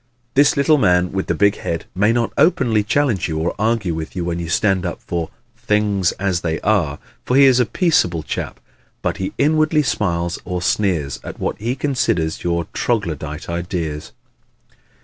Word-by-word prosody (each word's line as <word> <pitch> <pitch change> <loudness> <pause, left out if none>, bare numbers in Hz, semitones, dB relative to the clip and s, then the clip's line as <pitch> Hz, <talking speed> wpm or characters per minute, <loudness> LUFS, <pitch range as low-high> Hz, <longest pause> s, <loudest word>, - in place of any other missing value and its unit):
This 140 +1 +4
little 150 +2 +4
man 90 -4 +3
with 95 0 -2
the - - 0
big 100 0 +3
head 85 -1 -4
may 105 +4 +3
not 115 -1 0
openly 125 - +3
challenge 115 -2 +1
you 80 - -2
or 80 +2 -1
argue 110 -5 +1
with 80 +2 -6
you 90 -2 -2
when 85 0 -2
you 85 -1 -5
stand 95 0 +2
up 90 - -4
for 85 -2 -4 0.3
"things 105 -5 +1
as 95 -2 -1
they 80 -1 -2
are," 90 -10 +1 0.3
for 125 - +1
he 140 - +8
is 130 -2 +5
a 125 - +2
peaceable 90 - +1
chap - - -5 0.4
but - - -1
he 95 - -3
inwardly 155 0 +3
smiles 85 -9 -1
or 90 0 -3
sneers 85 - 0
at - - -8
what - - -3
he 120 +4 -2
considers 125 - -1
your 85 -1 0
troglodyte 80 - -2
ideas. 85 -3 -4
95 Hz, 175 wpm, -19 LUFS, 85-115 Hz, 0.4 s, he